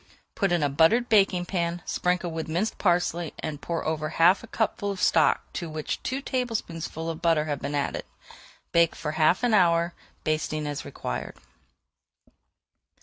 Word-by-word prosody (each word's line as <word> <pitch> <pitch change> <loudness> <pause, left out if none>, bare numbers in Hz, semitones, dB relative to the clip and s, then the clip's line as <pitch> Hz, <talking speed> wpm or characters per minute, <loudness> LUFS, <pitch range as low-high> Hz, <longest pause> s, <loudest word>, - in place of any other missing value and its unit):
Put 195 -3 0
in 175 -3 +2
a - - +4
buttered 165 - +3
baking 195 -4 +4
pan, 170 -2 -2
sprinkle 180 -1 0
with 160 0 -4
minced 175 +8 -1
parsley, 175 -3 +1
and 150 -2 -5
pour 170 -1 -3
over 155 -1 -1
half 170 +4 +4
a - - -9
cupful 205 -2 -1
of 195 -2 -4
stock - - +3
to 170 -3 -4
which 155 -1 -4
two 265 +2 -3
tablespoonfuls 170 - -3
of 165 +1 -8
butter 165 -3 +3
have 145 -3 -3
been 145 +1 -3
added. 140 - -2 0.7
Bake 170 -1 +3
for 150 - -4
half 160 +7 +3
an 240 -2 +2
hour, 170 -3 +4 0.3
basting 155 -1 -1
as 145 -1 -4
required. 60 - -5
170 Hz, 160 wpm, -26 LUFS, 155-185 Hz, 0.7 s, a